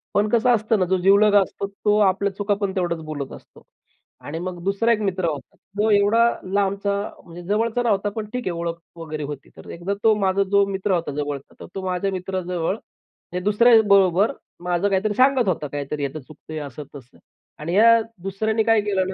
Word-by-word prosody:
पण 210 +1 +2
कसं 235 +2 +2
असतं 215 -1 0
ना, 185 - +2
जो 190 +1 +1
जिवलग 200 +3 +4
असतो 200 - -6
तो 210 +1 0
आपल्या 195 +1 -1
चुका 205 0 0
पण 195 -1 -1
तेवढंच 175 -3 -1
बोलत 145 -3 -5
असतो - - -17 0.6
आणि 160 +3 -5
मग 175 -1 -6
दुसरा 200 +4 +1
एक 215 - -2
मित्र 190 -3 -1
होता. 140 -4 -7 0.2
तो 220 +1 +3
एवढा 215 +4 +4 0.2
लांबचा 200 0 0 0.3
म्हणजे 170 +1 -11
जवळचा 225 +4 0
नव्हता 205 -3 +1
पण 220 - -3
ठीक 250 -1 -3
आहे 180 - 0
ओळख 170 0 -3 0.2
वगैरे 155 -2 -6
होती 145 -1 -7
तर - - -12
एकदा 175 +4 -3
तो 220 -1 +6
माझा 195 0 +2
जो 200 0 +5
मित्र 195 0 -2
होता 170 -4 -1
जवळचा 145 -2 -5
तर - - -9
तो 195 - -3
माझ्या 185 +2 -1
मित्राजवळ 185 0 -3 0.6
हे 180 - -1
दुसऱ्याबरोबर 205 -3 +4 0.3
माझं 180 +2 0
काहीतरी 200 +2 0
सांगत 260 -2 +3
होता 150 -4 -2
काहीतरी 145 0 -3
चुकतंय 155 +2 -10
असं 145 0 -7
तसं, 130 -3 -13 0.4
आणि 165 +4 -4
ह्या 230 +2 +6 0.2
दुसऱ्याने 220 +3 0
काय 225 -1 +3
केलं 195 -3 0
ना - - -4
195 Hz, 190 wpm, -22 LUFS, 170-210 Hz, 0.6 s, तो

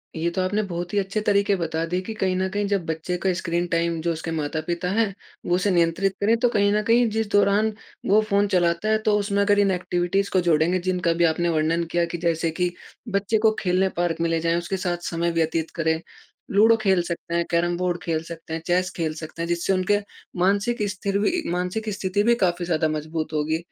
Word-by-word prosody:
ये 165 +1 0
तो 185 - -1
आपने 205 +3 0
बहुत 175 -2 -5
ही - - 0
अच्छे 195 +2 -2
तरीके 200 0 +3
बता 165 -2 -2
दिए 180 +1 0
कि 225 - -3
कहीं 190 -3 0
न 190 - 0
कहीं 205 0 0
जब 200 -4 0
बच्चे 160 +2 -3
का 190 +2 0
स्क्रीन 175 -1 -1
टाइम 170 -1 0
जो 170 +1 0
उसके 160 +1 -5
माता-पिता 160 +3 -2
हैं, 215 -1 +1 0.3
वो 175 - +2
उसे 185 +2 +1
नियंत्रित 175 +2 +1
करें 220 +3 +4
तो 245 0 +3
कहीं 205 -3 +2
न 210 - +2
कहीं 235 +1 +4
जिस 220 0 -1
दौरान 205 +2 +3 0.3
वो 210 +2 +4
फ़ोन 200 0 +3
चलाता 175 0 +1
है 220 - +4
तो 215 - +4
उसमें 200 0 0
अगर 205 0 +3
इन 200 -1 +3
एक्टिविटीज़ 180 +2 0
को 185 - +4
जोड़ेंगे 165 +3 +3
जिनका 180 -1 0
भी 170 +1 +1
आपने 170 +1 +1
वर्णन 160 +1 +1
किया 175 0 +2
कि - - -1
जैसे 165 -1 0
कि 180 0 +1 0.5
बच्चे 205 +2 +1
को - - +5
खेलने 185 0 +1
पार्क 170 -2 0
में 170 - +1
ले 165 0 +1
जाएँ, 165 +1 +1
उसके 175 +3 -2
साथ 180 -2 -1
समय 170 0 -1
व्यतीत 165 -1 -1
करें, 160 0 +1 0.5
लूडो 220 +3 +6
खेल 190 -4 +3
सकते 170 0 -4
हैं, 170 0 +1
कैरम 175 +1 +1
बोर्ड 180 -1 -1
खेल 160 -2 -1
सकते 165 -1 -8
हैं, 160 - -3
चेस 180 +1 +2
खेल 160 -2 -1
सकते 160 +1 -7
हैं। 170 - -2
जिससे 175 +3 0
उनके 190 +2 +2 0.4
मानसिक 205 +5 +1
स्थिर 200 +1 -2
भी 210 - +2 0.2
मानसिक 180 +5 -2
स्थिति 195 +1 0
भी 235 +2 +4
काफ़ी 175 0 -1
ज़्यादा 160 -2 +1
मज़बूत 155 +1 -4
होगी। 155 +1 0
180 Hz, 225 wpm, -24 LUFS, 170-200 Hz, 0.5 s, लूडो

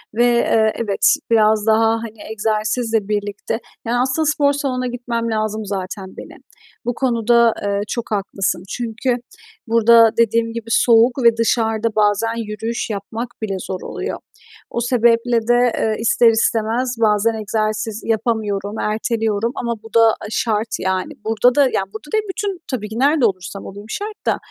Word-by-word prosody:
ve, 240 - +3
eee, 230 -2 +3
evet, 210 +4 +2 0.2
biraz 215 -1 +3
daha, 225 0 +4 0.2
hani, 225 -2 -9
egzersizle 220 0 -1
birlikte, 205 +1 -2 0.3
yani, 245 +1 +1
aslında 260 +5 +1
spor 290 -1 +2
salonuna 255 -3 -2
gitmem 235 -2 -3
lazım 215 0 -2
zaten 190 -1 -5
benim. - - -11 0.4
Bu 245 - 0
konuda, 235 -2 +3
eee, 200 0 0
çok 235 0 -4
haklısın 195 -3 -1
çünkü 240 +2 -2 0.5
burada 230 0 +6
dediğim 230 0 +2
gibi 230 -1 -6
soğuk 235 +3 +4
ve 230 -1 +5
dışarıda 225 -1 +1
bazen 215 +2 +2
yürüyüş 225 +3 -3
yapmak 220 +3 -5
bile 200 -3 -2
zor 185 0 -5
oluyor. - - -5 0.5
O - - -2
sebeple 235 -1 +2
de, 240 0 +4
eee, 220 -1 0
ister 230 +1 +4
istemez 225 +2 0
bazen 215 +1 +3
egzersiz 215 0 -2
yapamıyorum, 215 -2 -1
erteliyorum 220 0 -1
ama 235 -1 -2
bu 225 - -13
da, 230 - +7
aaa, - - 0
şart 220 0 0
yani. 190 0 -2
Burada 225 +4 +3
da, 290 - +5
yani, 255 -7 0
burada 295 +7 -9
değil 435 - +2
bütün 390 -1 -3
tabii 210 -5 -3
ki 220 +2 -5
nerede 285 -1 +3
olursam 195 -1 -3
olayım 205 +2 -10
şart 420 - -6
da, - - +2
225 Hz, 155 wpm, -19 LUFS, 215-240 Hz, 0.5 s, da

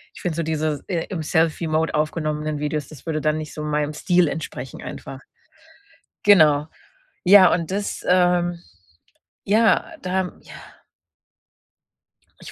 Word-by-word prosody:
ich - - -11
finde 175 -5 -2
so 165 - 0
diese, 155 -2 -2
äh, 170 -4 -2
im 170 -5 -4
Selfie-Mode 160 0 0
aufgenommenen 155 -1 -2
Videos, 150 -1 -3
das 155 -1 -14
würde 155 -1 -1
dann 155 0 +1
nicht 155 - -7
so 150 - -6
meinem 150 0 -1
Stil 175 +2 +2
entsprechen 135 -4 -6
einfach. 135 0 -8 1.0
Genau. 155 -7 +5 0.6
Ja, 185 -1 +7
und 165 0 -1
das 200 +1 -3
ähm, 175 -1 +2 0.9
ja, 220 +3 +3 0.2
da 185 0 -2
ja. - - -14 1.9
Ich - - -10
160 Hz, 130 wpm, -22 LUFS, 150-180 Hz, 1.9 s, Ja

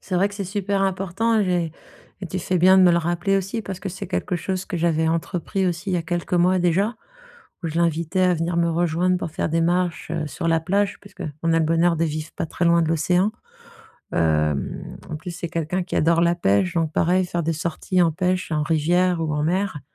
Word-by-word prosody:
C'est 190 - -5
vrai 195 +3 +3
que 200 - -11
c'est 200 -1 -4
super 200 +1 -1
important. 195 +4 +1
J'ai 175 -4 0 0.5
et - - -3
tu 185 - -3
fais 185 +1 -1
bien 185 +2 +6
de - - +7
me 175 - +6
le 170 - +3
rappeler 175 +4 0
aussi 195 +4 -2
parce 190 -2 -6
que 195 - -4
c'est 190 +2 -6
quelque 180 -1 -2
chose 185 +2 -3
que - - -4
j'avais 160 -1 +1
entrepris 180 +3 -1
aussi 175 +2 -2
il - - +1
y - - +2
a 170 - -1
quelques 175 +1 -2
mois 180 +1 +3
déjà, 190 +6 +1 0.7
où 165 - 0
je 160 - -2
l'invitais 170 +2 0
à 180 -1 +4
venir 170 +1 -2
me 170 0 +2
rejoindre 175 +2 +1
pour 165 - -4
faire - - -1
des 165 +1 +1
marches, 175 -1 0
heu, 160 -2 -2
sur 150 +4 -4
la 165 0 +3
plage, 195 +4 0
parce 200 - -16
qu'on 155 +2 -3
a 165 - +3
le - - +2
bonheur 165 +2 +2
de 165 - +1
vivre 155 0 -4
pas - - -2
très 170 - -2
loin 170 0 +4
de 160 - 0
l'océan. 180 +5 +2 0.8
Hem, 75 -3 0
en 155 - -3
plus, 175 +4 -7
c'est 170 0 -5
quelqu'un 165 +3 -2
qui - - -4
adore 165 +1 +3
la 170 0 +3
pêche, 170 - +1
donc 160 -2 0
pareil, 185 +2 +2
faire 175 -1 -2
des 165 - +1
sorties 170 +3 0
en 165 -2 +2
pêche, 180 +1 -1
en 150 -1 +1
rivière 170 +3 +2
ou 160 -2 -1
en 150 - -1
mer. 180 -2 -1
175 Hz, 240 wpm, -23 LUFS, 165-185 Hz, 0.8 s, de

